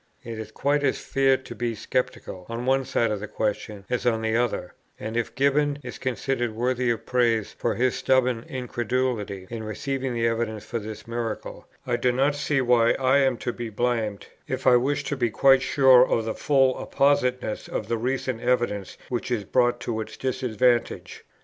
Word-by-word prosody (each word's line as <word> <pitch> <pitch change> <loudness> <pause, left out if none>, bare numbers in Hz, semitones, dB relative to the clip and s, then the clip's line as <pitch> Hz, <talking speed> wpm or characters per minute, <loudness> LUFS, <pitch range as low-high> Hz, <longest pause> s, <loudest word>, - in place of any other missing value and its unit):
It 115 -1 -6
is 110 -1 -7
quite 145 +5 0
as 135 - +2
fair 135 -1 +2
to 130 - -10
be 120 -1 -2
sceptical 100 -6 -3
on 115 +1 -4
one 135 +1 +2
side 115 -2 +1
of 105 - -2
the 105 - -6
question 105 -1 -3
as 125 - -1
on 115 -2 +1
the 110 0 0
other; 120 -1 -1 0.3
and 110 +1 -5
if 120 -2 -2
Gibbon 140 +1 +2
is 125 - -8
considered 125 -2 -2
worthy 125 +1 0
of 115 -3 -1
praise 115 -4 +1
for - - 0
his 125 +3 +2
stubborn 125 -3 +1
incredulity 120 -5 -2
in 115 -1 -4
receiving 130 +4 -3
the 115 0 0
evidence 115 -2 -1
for 115 +1 -3
this 105 0 -8
miracle, 115 -2 -5 0.2
I 120 -1 0
do 125 +1 +2
not 135 +4 +2
see 145 -1 0
why 120 -2 +4
I 135 +1 +3
am 135 -3 +2
to 120 - -1
be 120 -2 -5
blamed, 110 -2 -1 0.2
if 130 0 -4
I 125 - +7
wish 140 +4 +1
to 145 - -2
be 120 -3 0
quite 135 +4 +5
sure 130 -2 +6
of 115 - 0
the 110 - -2
full 135 -3 +2
appositeness 125 -5 +1
of 105 - -4
the 115 - 0
recent 130 -1 -2
evidence 120 -6 0
which 125 0 -3
is 120 -4 -1
brought 120 +3 +2
to 110 -2 -2
its 110 - -8
disadvantage. 125 -2 0
120 Hz, 190 wpm, -25 LUFS, 115-130 Hz, 0.3 s, I